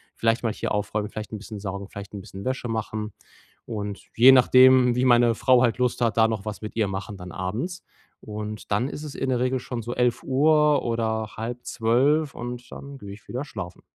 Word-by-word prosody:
vielleicht 115 +1 +1
mal 110 -2 0
hier - - -4
aufräumen, 105 0 -2
vielleicht 110 +1 -7
'n - - -3
bisschen 105 0 -8
saugen, 100 0 -5
vielleicht 100 0 -9
'n 100 - -6
bisschen 95 +2 -10
Wäsche 130 -2 -2
machen. 110 -1 -3 0.6
Und 105 -3 -5 0.2
je 130 +3 +9
nachdem, 130 -1 +6
wie 125 - +2
meine 120 -2 +5
Frau 125 0 +4
halt 120 0 +2
Lust 125 0 0
hat, 115 -1 +1
da 110 0 +5
noch 110 -3 -3
was 105 -2 -6
mit 105 - -6
ihr 105 -3 +1
machen, 100 +2 -5
dann 90 -1 -9
abends. 120 - -4 0.4
Und 105 -1 -6
dann 120 +6 +1
ist 150 - -7
es 145 - -7
in 135 - -3
der 125 - +1
Regel 130 0 0
schon 120 -1 -5
so 120 +2 -5
11:00 145 +5 +3
oder 110 -2 -1
halb 120 +2 -5
11:30 135 +6 +1
und 120 0 -7
dann 140 0 -9
gehe 100 -4 -9
ich 105 - -14
wieder 130 +4 -4
schlafen. 95 -9 -8
115 Hz, 210 wpm, -25 LUFS, 105-130 Hz, 0.6 s, je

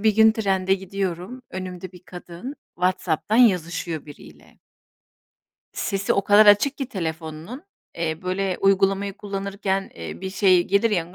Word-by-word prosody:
Ay, - - -11
bir 215 -1 +3
gün 220 0 +7
trende 195 -3 +1
gidiyorum, 190 +4 -4
önümde 185 -1 -7
bir 180 - -15
kadın 175 - -8 0.2
WhatsApp'tan 180 +1 0
yazışıyor 175 - +2
biriyle. 80 - -15 1.1
Sesi 195 0 -1
o 195 - 0
kadar 205 +1 +6
açık 205 +8 +5
ki 270 - -2
telefonunun, 165 - -5 0.3
eee, 160 0 -3
böyle, 185 0 -1
uygulamayı 195 0 +2
kullanırken, 195 -1 -3
eee, 85 -1 -8
bir 190 0 -4
şey 190 -2 +4
gelir 200 +4 +2
ya, 175 -3 -2
190 Hz, 140 wpm, -23 LUFS, 175-200 Hz, 1.1 s, gün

